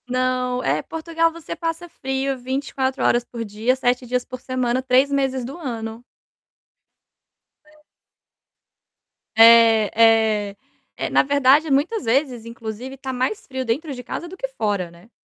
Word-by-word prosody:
Não. 255 0 0
É, 145 +3 +1
Portugal 330 - -1
você 335 0 -8
passa 330 +1 -4
frio 265 -3 -3
24 265 +1 -2
horas 240 - +3
por 235 -1 -7
dia, 220 +5 0
7 250 -1 0
dias 250 +1 -1
por 255 -1 -9
semana, 255 -1 -1
3 260 +2 +3
meses 265 -2 0
do 275 +6 -7
ano. 230 -6 -6 1.6
É. 305 0 -23 1.5
É, 225 -1 +7 0.6
é. 200 - -20 0.4
É, - - -2
na - - +4
verdade, 285 +2 +3
muitas 315 +11 +1
vezes, 250 -1 0
inclusive, 230 +2 -7
está 265 0 -6
mais 255 +12 -2
frio 260 -1 -4
dentro 285 +7 -2
de 250 -1 -8
casa 345 - -6
do 375 +2 -11
que - - -3
fora, 205 - -2
né. 170 +6 -18
255 Hz, 145 wpm, -22 LUFS, 235-280 Hz, 1.6 s, É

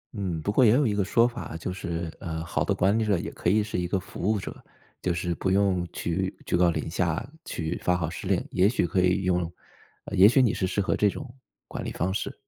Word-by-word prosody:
嗯， 90 -5 -2
不 100 - 0
过 130 - +4
也 110 - +7
有 140 +2 +3
一 105 - +1
个 100 -1 +1
说 115 +5 +3
法， 120 -9 -6
就 90 +2 -4
是， 85 -3 -4
呃， 80 -1 -4
好 - - -1
的 - - 0
管 100 +4 +2
理 - - +1
者 100 -4 +2
也 100 +5 -4
可 - - -1
以 105 +2 +3
是 105 -3 -3
一 90 - -1
个 95 +1 0
服 100 +2 -3
务 105 - +1
者。 - - -8 0.4
就 90 - 0
是 85 0 -2
不 95 - -1
用 95 -3 +2
去 - - -2
居 - - 0
高 85 -1 +4
临 - - -3
下， 85 +6 -1 0.2
去 85 - -3
发 90 0 +2
号 80 -2 -2
施 - - -7
令， - - +1
也 95 +3 +4
许 100 -7 +1
可 90 - +1
以 90 +1 +2
用 90 -1 +1 0.6
啊， - - -8
也 95 +3 +8
许 130 +2 +4
你 120 - +3
是 95 - -1
适 95 +2 -2
合 95 - +1
这 105 - +3
种， 130 +5 -7 0.4
管 - - -6
理 - - -4
方 95 +3 -1
式。 - - -3
95 Hz, 280 characters per minute, -26 LUFS, 85-105 Hz, 0.6 s, 也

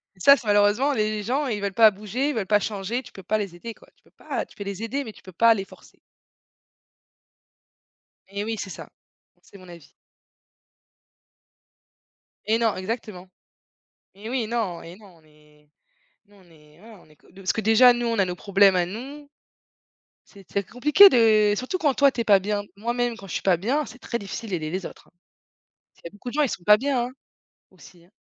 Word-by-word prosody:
Et - - -25
ça, 280 +9 +7
c'est 235 - -12
malheureusement, 205 +7 +3
les 215 -2 -1
gens, 270 +6 -1
ils 215 -4 -2
veulent 200 -1 -3
pas 220 0 +7
bouger, 215 +8 -3
ils 290 - -3
veulent 210 -4 -2
pas 210 +1 +3
changer, 210 +4 -4
tu - - -15
peux 195 - -12
pas 215 +4 0
les 195 -4 -5
aider, 230 +6 -8
quoi. - - -22
Tu - - -36
peux - - -27
pas - - -5
tu - - -22
peux 205 - -7
les 200 +2 -6
aider, 275 +5 -3
mais 220 - -8
tu - - -20
peux 185 - -12
pas 230 +6 +4
les 195 -1 -5
forcer. - - -19 2.3
Et 200 +1 -4
oui, 225 +1 -3
c'est 195 - -6
ça, - - -10 0.5
c'est 200 - -17
mon 185 -1 -16
avis. 170 -2 -14 2.5
Et 220 +2 +2
non, 230 -2 +1
exactement. 190 -2 -6 0.9
Et 205 +3 -10
oui, 250 -4 -1
non 215 -7 -3
et 170 +2 -11
non, 200 -5 -18
on - - -27
est, 150 -1 -25 0.6
nous 205 0 -24
on 190 - -21
est, 150 0 -22
voilà, 220 -2 -15
on - - -23
est 155 - -21
co - - -26
parce 195 -1 -2
que, - - -4
déjà, 225 +4 +6
nous, 240 0 -1
on 230 - -1
a 190 - +3
nos 180 0 -4
problèmes 195 0 +3
à 175 -1 +2
nous. 275 +9 -9 0.9
C'est 195 -2 -18
c'est 200 - -1
c'est - - -20
compliqué 300 +11 +7
de 215 - +4
surtout 255 - -3
quand 290 -6 +1
toi, 280 0 +4
tu 235 - -3
es - - -1
pas 205 -3 +5
bien. 205 +1 -2
Moi, 230 +4 -3
même 245 -1 -1
quand 195 -3 -12
je - - -8
suis - - -2
pas 185 -3 +3
bien, 265 - -1
c'est 250 +3 -13
très 235 - -4
difficile 205 +2 -7
d'aider 160 -4 -3
les 185 0 -4
autres, - - -11
hein. - - -43 0.8
C'est - - -27
il - - -7
y - - -4
a - - -22
beaucoup 205 +4 -10
de 245 - -7
gens, 300 - +2
ils 280 - +1
sont 180 - -6
pas 210 +2 +7
bien, 255 -1 -1
hein, 250 - -8 0.6
aussi, 170 -2 -19
hein. - - -27
210 Hz, 225 wpm, -24 LUFS, 190-240 Hz, 2.5 s, ça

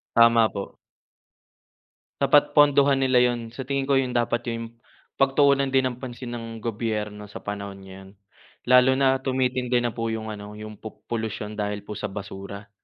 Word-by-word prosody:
Tama 115 -1 +6
po. 100 -2 -7 1.5
Dapat 145 +1 +4
pondohan 140 -2 +5
nila 130 -1 +4
'yon, 120 -2 +1
sa 125 +3 -7
tingin 140 0 -1
ko 135 - +5
'yon 130 -2 -1
dapat 120 0 0
'yong, 115 -1 -4 0.5
pagtuunan 140 0 +3
din 135 - +5
ng 125 - -9
pansin 125 -1 -7
ng 120 -1 -5 0.2
gobyerno 105 -2 -3
sa 105 - -10
panahon 100 -1 -6
ngayon. 95 0 -12 0.6
Lalo 125 +1 +7
na 135 0 +3
tumitindi 125 -2 0
na 120 - 0
po 115 0 -4
'yong 110 -1 -4
ano, 105 0 -8
'yong 105 0 -9
po 110 - -11
polusyon 110 -2 -4
dahil 105 0 -2
po 105 0 -7
sa - - -3
basura. 100 0 -8
115 Hz, 165 wpm, -25 LUFS, 105-130 Hz, 1.5 s, Lalo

